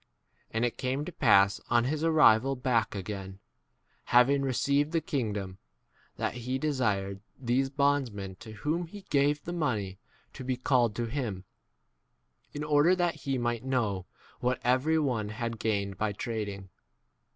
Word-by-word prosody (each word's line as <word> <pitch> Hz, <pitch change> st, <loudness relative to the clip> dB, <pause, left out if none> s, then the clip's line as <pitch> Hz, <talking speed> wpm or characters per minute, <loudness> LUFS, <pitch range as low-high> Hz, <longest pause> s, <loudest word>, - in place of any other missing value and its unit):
And 115 Hz, +2 st, 0 dB
it 120 Hz, -, -3 dB
came 135 Hz, +3 st, -1 dB
to 180 Hz, -, -6 dB
pass 100 Hz, -, +4 dB
on 120 Hz, 0 st, +4 dB
his 150 Hz, +5 st, -1 dB
arrival 135 Hz, -5 st, +5 dB
back, 125 Hz, -4 st, 0 dB
again, 95 Hz, -1 st, -6 dB, 0.7 s
having 130 Hz, +3 st, +4 dB
received 140 Hz, +3 st, +1 dB
the 165 Hz, -, +3 dB
kingdom, 105 Hz, -10 st, -3 dB, 0.6 s
that -, -, -1 dB
2 125 Hz, -, -7 dB
he 125 Hz, +2 st, -2 dB
desired 105 Hz, -10 st, -1 dB, 0.2 s
these 130 Hz, +2 st, +1 dB
bondsmen 135 Hz, -9 st, 0 dB
to 110 Hz, -4 st, -10 dB
whom 155 Hz, -, -2 dB
he 205 Hz, +4 st, -10 dB
gave 145 Hz, +1 st, +2 dB
the 175 Hz, -, -5 dB
money 105 Hz, -, -2 dB, 0.3 s
to -, -, -8 dB
be 130 Hz, 0 st, -1 dB
called 125 Hz, -4 st, +2 dB
to 120 Hz, -, -1 dB
him, 115 Hz, -7 st, -3 dB, 1.1 s
in 150 Hz, -, -5 dB
order 150 Hz, +4 st, +4 dB
that 175 Hz, -2 st, +1 dB
he 135 Hz, -2 st, -3 dB
might 120 Hz, -1 st, -1 dB
know 110 Hz, -8 st, -1 dB, 0.3 s
what 125 Hz, 0 st, 0 dB
every 130 Hz, +6 st, +2 dB
one 125 Hz, -9 st, 0 dB
had 115 Hz, +2 st, -3 dB
10 115 Hz, -, -7 dB
gained 100 Hz, -3 st, -1 dB
by 105 Hz, -1 st, 0 dB
trading. 100 Hz, -3 st, -4 dB
125 Hz, 155 wpm, -29 LUFS, 105-140 Hz, 1.1 s, arrival